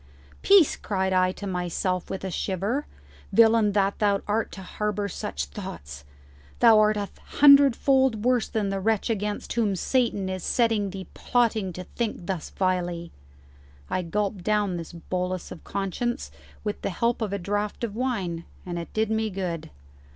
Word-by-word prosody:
"Peace!" 390 Hz, -7 st, +6 dB
cried 190 Hz, -2 st, -1 dB
I 185 Hz, 0 st, +3 dB
to 205 Hz, -, -8 dB
myself 180 Hz, 0 st, -2 dB
with 190 Hz, -, -5 dB
a 190 Hz, -, -3 dB
shiver; 200 Hz, +11 st, -2 dB, 0.4 s
"villain 225 Hz, -2 st, +5 dB
that 200 Hz, -1 st, +1 dB
thou 200 Hz, -2 st, +2 dB
art 215 Hz, +2 st, 0 dB
to 190 Hz, -, -8 dB
harbour 210 Hz, +1 st, -2 dB
such 70 Hz, -, -4 dB
thoughts! 70 Hz, 0 st, -8 dB, 0.5 s
Thou 225 Hz, -2 st, +7 dB
art 215 Hz, 0 st, +4 dB
a 205 Hz, -1 st, -3 dB, 0.3 s
hundred 280 Hz, -3 st, +8 dB
fold 265 Hz, -5 st, +2 dB
worse 250 Hz, -2 st, +3 dB
than 210 Hz, -3 st, -1 dB
the 195 Hz, 0 st, -1 dB
wretch 220 Hz, +3 st, +1 dB
against 210 Hz, -1 st, -3 dB
whom 220 Hz, -4 st, +1 dB
Satan 230 Hz, -2 st, 0 dB
is 185 Hz, -2 st, -4 dB
setting 225 Hz, -4 st, +1 dB
thee 190 Hz, 0 st, -7 dB
plotting 225 Hz, -5 st, +1 dB
to 180 Hz, -, -6 dB
think 215 Hz, -2 st, -4 dB
thus 185 Hz, -4 st, -3 dB
vilely." 175 Hz, -2 st, -1 dB, 0.8 s
I 185 Hz, -, +1 dB
gulped 195 Hz, +2 st, -2 dB
down 205 Hz, -3 st, +1 dB
this 165 Hz, -1 st, -7 dB
bolus 180 Hz, +1 st, -4 dB
of 165 Hz, -, -9 dB
conscience 200 Hz, +5 st, -3 dB, 0.3 s
with 210 Hz, -1 st, -3 dB
the -, -, -1 dB
help 235 Hz, +6 st, 0 dB
of 215 Hz, -3 st, -1 dB
a 200 Hz, -, -1 dB
draught 205 Hz, +4 st, -2 dB
of 220 Hz, -3 st, -3 dB
wine, 195 Hz, -10 st, -2 dB, 0.2 s
and 175 Hz, -1 st, -4 dB
it 170 Hz, -, -7 dB
did 220 Hz, 0 st, 0 dB
me 220 Hz, 0 st, 0 dB
good. 180 Hz, -5 st, -4 dB
200 Hz, 165 wpm, -26 LUFS, 185-220 Hz, 0.8 s, hundred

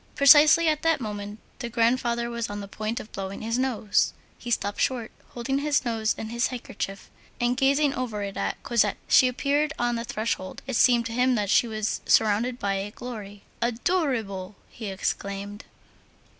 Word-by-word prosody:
Precisely 300 Hz, +4 st, +7 dB
at 305 Hz, -1 st, +1 dB
that 325 Hz, -2 st, +2 dB
moment, 205 Hz, -2 st, -5 dB, 0.2 s
the 240 Hz, -, -4 dB
grandfather 235 Hz, 0 st, +1 dB
was 235 Hz, -1 st, -3 dB
on 205 Hz, 0 st, -5 dB
the 200 Hz, -, -7 dB
point 215 Hz, +3 st, -4 dB
of 215 Hz, -, -10 dB
blowing 195 Hz, 0 st, -6 dB
his 230 Hz, +2 st, -1 dB
nose; 230 Hz, -5 st, +1 dB, 0.3 s
he 240 Hz, -, -7 dB
stopped 205 Hz, -3 st, -1 dB
short, 240 Hz, -4 st, -1 dB, 0.2 s
holding 270 Hz, +3 st, -1 dB
his 285 Hz, -2 st, +1 dB
nose 225 Hz, -2 st, 0 dB
in 220 Hz, -, -5 dB
his 235 Hz, +1 st, 0 dB
handkerchief, 195 Hz, -5 st, -6 dB, 0.3 s
and 240 Hz, +1 st, +1 dB
gazing 275 Hz, +2 st, +3 dB
over 230 Hz, -6 st, -3 dB
it 200 Hz, -1 st, -5 dB
at -, -, -3 dB
Cosette. 215 Hz, -4 st, +1 dB
She 255 Hz, -, +6 dB
appeared 285 Hz, +4 st, 0 dB
on 240 Hz, 0 st, 0 dB
the 230 Hz, -, -3 dB
threshold; 215 Hz, -4 st, -3 dB
it 265 Hz, -1 st, -3 dB
seemed 240 Hz, 0 st, +4 dB
to 230 Hz, -, -4 dB
him 250 Hz, +1 st, +2 dB
that 205 Hz, -3 st, 0 dB
she 240 Hz, -, +4 dB
was 215 Hz, -1 st, -2 dB
surrounded 225 Hz, +3 st, +3 dB
by 200 Hz, -4 st, -1 dB
a 195 Hz, +1 st, -3 dB
glory. 210 Hz, -4 st, -8 dB, 0.2 s
"Adorable!" 235 Hz, -, -1 dB, 0.2 s
he 220 Hz, -, -7 dB
exclaimed. 200 Hz, +1 st, -4 dB
235 Hz, 175 wpm, -26 LUFS, 205-255 Hz, 0.3 s, Precisely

